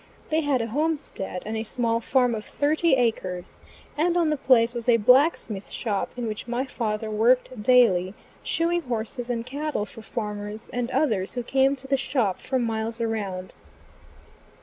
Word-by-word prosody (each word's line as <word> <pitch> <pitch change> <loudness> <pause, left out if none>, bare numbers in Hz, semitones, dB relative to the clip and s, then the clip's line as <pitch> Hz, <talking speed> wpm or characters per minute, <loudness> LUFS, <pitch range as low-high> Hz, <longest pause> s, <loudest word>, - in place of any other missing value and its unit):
They 315 +1 +3
had 280 -5 +1
a - - -3
homestead 290 - -2
and 220 +1 -3
a 220 - -1
small 230 0 0
farm 250 +1 +2
of 215 -1 -4
thirty 305 +3 +2
acres, 190 -8 -2 0.4
and 340 +3 +1
on 330 -3 +2
the - - +2
place 245 -4 +4
was 240 0 -3
a 235 - +6
blacksmith 245 - +3
shop 210 -4 -2
in 245 - -3
which 215 +1 -5
my 240 +2 -1
father 215 -4 -3
worked 240 +2 +2
daily, 210 -6 +4 0.3
shoeing 340 +1 0
horses 240 -2 -4
and 235 -1 -2
cattle 285 -4 -3
for 225 - -12
farmers 210 -1 -5
and 245 -1 -2
others 220 -9 0
who 245 - -2
came 270 +3 +2
to 270 0 -10
the 275 0 +2
shop 245 -8 0
from 260 -2 -1
miles 225 0 -2
around. 200 -5 -3
235 Hz, 170 wpm, -25 LUFS, 215-270 Hz, 0.4 s, a